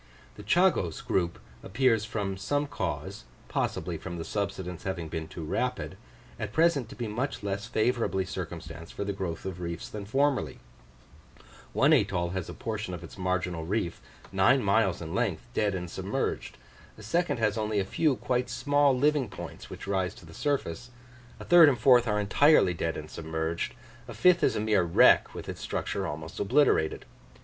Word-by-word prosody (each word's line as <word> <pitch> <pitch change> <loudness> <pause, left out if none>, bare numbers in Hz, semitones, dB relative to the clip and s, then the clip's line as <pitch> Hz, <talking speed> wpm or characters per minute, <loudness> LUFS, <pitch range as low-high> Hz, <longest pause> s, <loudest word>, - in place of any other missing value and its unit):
The - - -11
Chagos 110 - +2
group 85 -2 0 0.2
appears 115 0 +2
from 105 -3 -3
some 145 +10 -1
cause, 145 - -4 0.2
possibly - - -2
from 85 -2 -6
the 80 - -5
subsidence 95 -4 -3
having 95 -5 -4
been 80 0 -4
too 80 - -8
rapid, 75 - -2 0.4
at 105 -1 -4
present 155 -7 +3
to - - -10
be 120 - -4
much 120 +2 -3
less 100 +2 -3
favourably 115 -4 +1
circumstanced 85 -1 -7
for - - -2
the 100 0 -2
growth 95 -4 -4
of 90 -2 -5
reefs 85 -1 -5
than 105 -2 -6
formerly: 135 +5 0 1.1
one - - +4
atoll 85 0 +2
has 95 -2 -4
a - - -6
portion 110 -5 -4
of 85 - -10
its - - -10
marginal 90 -3 -1
reef, 90 0 -2 0.3
nine 120 +8 +4
miles 100 -4 +2
in 80 +1 -6
length, 105 -5 -1
dead 105 -4 +1
and 90 -2 -5
submerged; - - -3 0.4
a 110 - -12
second 170 +11 0
has 110 -2 +1
only 110 -1 -1
a 95 - 0
few 145 +8 +1
quite 125 0 -1
small 145 -2 +2
living 145 -1 +2
points - - -9
which - - -8
rise 95 -2 -1
to - - -14
the 80 - -13
surface, 125 - -2 0.5
a - - -8
third 170 -3 +8
and 130 - 0
fourth 120 +1 +5
are 105 -1 +1
entirely 105 - +4
dead 80 -1 -2
and 75 0 -8
submerged; 80 +1 -3 0.3
a - - -8
fifth 180 -1 +5
is - - +3
a - - 0
mere 105 -2 +3
wreck, 85 -1 +5
with - - -7
its - - -6
structure - - -2
almost 75 +2 -6
obliterated. 110 - +2
100 Hz, 175 wpm, -28 LUFS, 90-125 Hz, 1.1 s, third